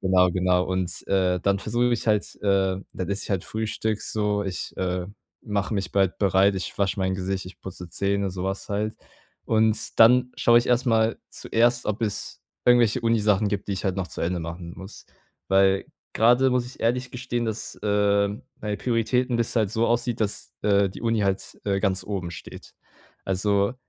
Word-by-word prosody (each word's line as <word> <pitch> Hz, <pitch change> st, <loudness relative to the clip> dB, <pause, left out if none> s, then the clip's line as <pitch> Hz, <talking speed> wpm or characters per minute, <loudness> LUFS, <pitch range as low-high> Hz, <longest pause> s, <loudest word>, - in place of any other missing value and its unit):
genau, 90 Hz, -1 st, +4 dB
genau. 90 Hz, 0 st, +2 dB
Und, 95 Hz, -1 st, -3 dB
äh, 90 Hz, -2 st, +2 dB
dann 100 Hz, +1 st, +1 dB
versuche 120 Hz, +3 st, 0 dB
ich -, -, +2 dB
mich 120 Hz, -1 st, -1 dB
halt 105 Hz, -1 st, +3 dB, 0.2 s
äh, 95 Hz, -2 st, +2 dB, 0.2 s
dann 90 Hz, 0 st, -4 dB
esse 100 Hz, -1 st, -1 dB
ich -, -, -8 dB
halt 95 Hz, -3 st, 0 dB
Frühstück 110 Hz, 0 st, -2 dB
so, 105 Hz, -1 st, -1 dB
ich, 95 Hz, -2 st, -5 dB
äh, 90 Hz, -1 st, -2 dB, 0.4 s
mache 105 Hz, -1 st, -2 dB
mich 95 Hz, -1 st, -3 dB
bald 95 Hz, -2 st, +1 dB
bereit, 100 Hz, 0 st, +3 dB
ich 95 Hz, -, -5 dB
wasche 100 Hz, 0 st, 0 dB
mein 95 Hz, 0 st, 0 dB
Gesicht, 95 Hz, +1 st, -3 dB
ich 95 Hz, -, -12 dB
putze 90 Hz, -2 st, -8 dB
Zähne, 100 Hz, +2 st, -1 dB
sowas 95 Hz, +1 st, -4 dB
halt, 105 Hz, +2 st, -2 dB, 0.5 s
und 110 Hz, -1 st, +1 dB
dann 125 Hz, +2 st, +6 dB
schaue 120 Hz, 0 st, +5 dB
ich 120 Hz, -, -1 dB
erstmal 115 Hz, -2 st, +2 dB
zuerst, 120 Hz, +2 st, +1 dB
ob 105 Hz, +2 st, -2 dB
es 105 Hz, -2 st, -3 dB, 0.2 s
irgendwelche 120 Hz, -3 st, +5 dB
Uni-Sachen 105 Hz, -3 st, +2 dB
gibt, 100 Hz, 0 st, -3 dB
die -, -, 0 dB
ich 95 Hz, -, -3 dB
halt 95 Hz, 0 st, 0 dB
noch 95 Hz, -1 st, -2 dB
zu 85 Hz, -, -7 dB
Ende 85 Hz, +1 st, -1 dB
machen 85 Hz, +1 st, -7 dB
muss, 95 Hz, +2 st, -11 dB, 0.4 s
weil 95 Hz, 0 st, +3 dB, 0.3 s
grade 125 Hz, +4 st, +4 dB
muss 125 Hz, -1 st, +1 dB
ich 125 Hz, -, -12 dB
ehrlich 125 Hz, +2 st, 0 dB
gestehen, 120 Hz, -2 st, -3 dB
dass, 110 Hz, 0 st, -4 dB
äh, 100 Hz, -1 st, +2 dB, 0.3 s
meine 105 Hz, -1 st, -2 dB
Prioritäten 125 Hz, +1 st, +1 dB
dass 115 Hz, -, +1 dB
es -, -, -3 dB
halt 110 Hz, -4 st, +2 dB
so 110 Hz, +2 st, +1 dB
aussieht, 120 Hz, 0 st, 0 dB
dass, 105 Hz, -1 st, -2 dB
äh, 100 Hz, -1 st, +3 dB
die -, -, -10 dB
Uni 115 Hz, -1 st, +1 dB
halt, 100 Hz, -1 st, -2 dB
äh, 100 Hz, -1 st, 0 dB
ganz 95 Hz, -2 st, 0 dB
oben 95 Hz, -4 st, -4 dB
steht. 80 Hz, -, -11 dB, 0.5 s
Also, 100 Hz, +3 st, +1 dB
100 Hz, 190 wpm, -25 LUFS, 95-115 Hz, 0.5 s, dann